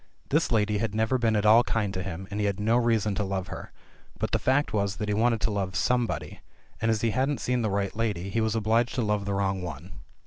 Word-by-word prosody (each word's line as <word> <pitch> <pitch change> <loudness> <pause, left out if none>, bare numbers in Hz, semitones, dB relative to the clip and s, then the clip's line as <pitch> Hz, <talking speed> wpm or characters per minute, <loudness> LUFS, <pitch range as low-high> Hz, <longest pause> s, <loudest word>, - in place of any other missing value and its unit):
This 155 +1 +1
lady 105 -2 +2
had 110 -1 -2
never 110 +4 +1
been 115 -2 +2
at 105 0 +1
all 110 +3 +7
kind 105 -5 -1
to 95 - -3
him, 95 0 -6
and 100 - -3
he 105 - +1
had 100 -1 -2
no 110 +3 +2
reason 115 -4 +2
to 105 - -1
love 95 -1 -3
her; - - -8 0.5
but - - -2
the - - +1
fact 135 0 +1
was 100 -2 0
that 105 - -4
he 105 - 0
wanted 115 +2 +2
to 110 - 0
love 95 -2 -2
somebody, 120 +6 -1 0.4
and 115 - +1
as 110 -2 +1
he 115 - +1
hadn't 135 +3 0
seen 125 -1 0
the 110 - 0
right 100 0 -1
lady, 105 -4 -2
he 115 - 0
was 110 0 0
obliged 115 +2 +1
to 125 - 0
love 105 -1 0
the 100 -1 -1
wrong 95 -1 0
one. 85 +1 -7
105 Hz, 255 wpm, -27 LUFS, 100-115 Hz, 0.5 s, all